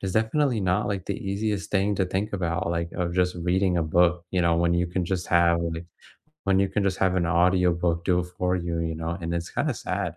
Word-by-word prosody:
it's 95 -1 -3
definitely 115 +2 +1
not, 95 +2 +1
like, 100 -3 -3
the - - -2
easiest 105 0 -2
thing 100 +1 +1
to 95 -1 +1
think 100 +4 -2
about, 85 -2 -1
like, 85 0 -2
of 85 -1 -2
just 90 0 +1
reading 90 +1 +1
a 85 - +2
book, 85 +2 +2
you 90 - +1
know, 85 -1 +3
when 85 0 +2
you 85 +1 +1
can 90 +1 -2
just 90 0 -2
have 85 -1 +4 0.9
when 95 -1 +3
you 100 0 +2
can 105 +2 -1
just 95 -1 0
have 95 -1 +2
an 90 - +1
audiobook 85 -1 +2
do 90 -2 +2
it - - -3
for 90 0 +1
you, 85 -1 -2
you 80 0 -2
know, 80 +1 -3
and 85 0 -3
it's, 85 0 -3
kinda, - - 0
sad - - -3
90 Hz, 235 wpm, -25 LUFS, 85-95 Hz, 0.9 s, have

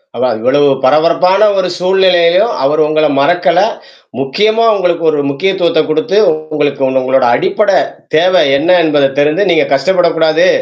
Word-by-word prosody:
அவா 130 - -1
இவ்வளவு 145 +5 +1 0.2
பரபரப்பான 170 +8 +2
ஒரு 185 -1 -1
சூழ்நிலையிலயும், 180 +1 +1
அவர் 150 +3 0
உங்கள 155 0 0
மறக்கல, 175 +3 +1 0.6
முக்கியமா 215 +12 0
உங்களுக்கு 175 -3 -2
ஒரு 150 -1 -1
முக்கியத்துவத்த 170 +2 -1
குடுத்து 155 +6 -1 0.3
உங்களுக்கு 145 -2 -2
உ - - -2
உங்களோட 130 0 0
அடிப்படை 205 - 0 0.4
தேவை 180 +3 +2 0.2
என்ன 180 +5 +2
என்பத 145 -4 0
தெரிந்து 155 +7 0
நீங்க 165 - +1
கஷ்டப்படக்கூடாது. 165 +1 +1
165 Hz, 130 wpm, -11 LUFS, 145-185 Hz, 0.6 s, பரபரப்பான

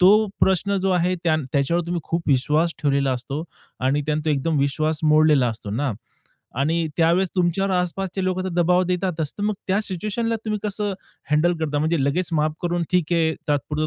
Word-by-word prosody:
तो 210 +4 +6
प्रश्न 195 +2 +2
जो 195 - +2
आहे, 180 0 +2
त्यां 155 -1 +3
त्याच्यावर 170 +5 +1
तुम्ही 175 0 -2
खूप 170 0 -2
विश्वास 150 +5 +2
ठेवलेला 140 -2 +2
असतो 135 +5 -4 0.4
आणि 135 +3 +1
त्यानं 150 0 0
तो 155 - +1
एकदम 145 +2 0
विश्वास 155 +3 0
मोडलेला 155 -4 +4
असतो 110 -3 -6
ना 130 +3 -1 0.7
आणि 165 +3 +1
त्यावेळेस 170 +3 +3
तुमच्यावर 180 +2 +1
आसपासचे 185 +1 -2
लोकं 185 0 -1
तर - - -1
दबाव 180 +1 +3
देतातच, 180 -4 -2
तर - - -3
मग 210 0 +1
त्या 195 +3 +2
सिच्युएशनला 215 +4 -2
तुम्ही 215 -1 -1
कसं 205 -1 -2 0.4
हँडल 165 +4 +3
करता? 150 -2 -1
म्हणजे 160 -1 +1
लगेच 170 +6 0
माफ 155 -1 +1
करून 175 0 0
ठीक 175 -2 +1
आहे 160 -2 +2
तात्पुरता 150 +2 0
165 Hz, 180 wpm, -23 LUFS, 150-185 Hz, 0.7 s, तो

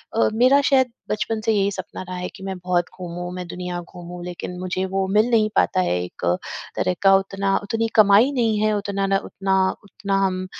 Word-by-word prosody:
अ, 230 - +3
मेरा 255 +5 +5
शायद 265 -3 +3 0.2
बचपन 215 +1 -1
से 225 - +3
यही 200 -1 +2
सपना 185 -2 -7
रहा 185 0 -7
है 180 0 -4
कि 190 - -11
मैं 190 -1 -4
बहुत 180 -1 0
घूमूँ, 175 0 -5
मैं 180 -1 -6
दुनिया 180 0 -5
घूमूँ। 175 0 -10
लेकिन 180 0 -6
मुझे 185 +1 -2
वो 190 0 -1
मिल 215 +3 +4
नहीं 215 -2 +3
पाता 185 - +3
है। 90 - 0
एक 90 - -7 0.5
तरह 185 - +1
का 195 0 +7
उतना 195 0 0
उतनी 225 +2 -1
कमाई 215 +5 +6
नहीं 225 -5 +1
है, 215 0 +2
उतना 200 -1 -1
ना 195 0 +3
उतना 190 -1 +1
उतना 200 -1 -3
हम 185 -1 -2
195 Hz, 205 wpm, -22 LUFS, 180-215 Hz, 0.5 s, का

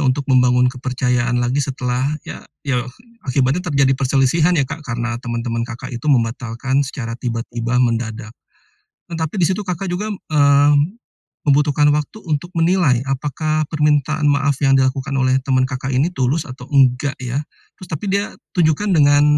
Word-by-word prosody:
untuk 140 0 +1
membangun 125 -1 +3
kepercayaan 125 -1 -1
lagi 125 +3 +1
setelah, 130 +1 -1
ya, - - -8 0.2
ya 135 -3 0 0.5
akibatnya 135 +6 +1
terjadi 140 -6 +2
perselisihan 135 +6 +2
ya 140 - +2
Kak, 155 - -7
karena 120 0 -3
teman-teman 115 0 -3
Kakak 120 +1 -7
itu 120 +5 -4
membatalkan 120 +1 0
secara 130 -4 -4
tiba-tiba, 120 0 -3
mendadak. 115 -2 -1 0.8
Tetapi 160 +1 -3
di 165 - +5
situ 200 +1 -2
Kakak 180 +1 -3
juga, 185 +4 -2
eee, 145 -4 +3 0.7
membutuhkan 145 +1 +3
waktu 150 +8 -3
untuk 150 +4 -1
menilai, 165 -8 +3
apakah 155 +3 -1
permintaan 150 0 +1
maaf 140 -1 +2
yang 135 -1 +4
dilakukan 135 +1 0
oleh 130 0 +3
teman 130 -1 +1
Kakak 135 0 -4
ini 145 +7 +2
tulus 140 +3 0
atau 130 -1 -10
enggak 135 0 +3
ya? 130 +4 -2 0.4
Terus 185 - -11
tapi 160 +6 -4
dia, 200 +1 -1 0.2
tunjukkan 175 +3 +2
dengan, 145 -1 +5
135 Hz, 150 wpm, -19 LUFS, 125-150 Hz, 0.8 s, di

